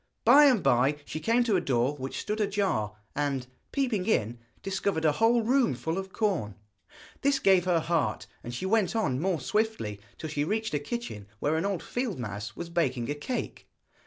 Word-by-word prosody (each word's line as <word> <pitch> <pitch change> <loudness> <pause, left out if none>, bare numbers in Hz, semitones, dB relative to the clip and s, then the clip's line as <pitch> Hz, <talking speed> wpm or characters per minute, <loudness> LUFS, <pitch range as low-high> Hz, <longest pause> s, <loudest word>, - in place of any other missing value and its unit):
By 280 +6 +8
and 255 -8 +4
by 130 +5 +3
she 155 - -5
came 230 +9 +2
to 225 -4 +1
a - - 0
door 130 +2 +1
which 135 -1 -5
stood 215 +1 -2
ajar, 195 - 0 0.2
and, 140 -3 -1 0.3
peeping 235 -9 0
in, 120 - +1 0.2
discovered 195 -4 -1
a 155 - +5
whole 225 +8 +3
room 255 +1 +2
full 165 +3 -2
of 190 0 -7
corn. 180 - -1 0.7
This 280 0 +3
gave 190 -7 +4
her 175 -2 +3
heart, 165 -1 0 0.2
and 120 - -6
she 120 +9 -4
went 210 0 +2
on 170 - +1
more 180 0 0
swiftly, 190 - -1 0.2
till 155 -1 -6
she 145 -1 0
reached 220 +5 -1
a 145 - +1
kitchen 145 - -5
where 150 +5 +1
an 165 +5 0
old 195 -4 -2
field 245 -7 -3
mouse 105 -3 -5
was 170 -1 -6
baking 135 -7 0
a - - +1
cake. 195 - -5
180 Hz, 190 wpm, -28 LUFS, 140-220 Hz, 0.7 s, By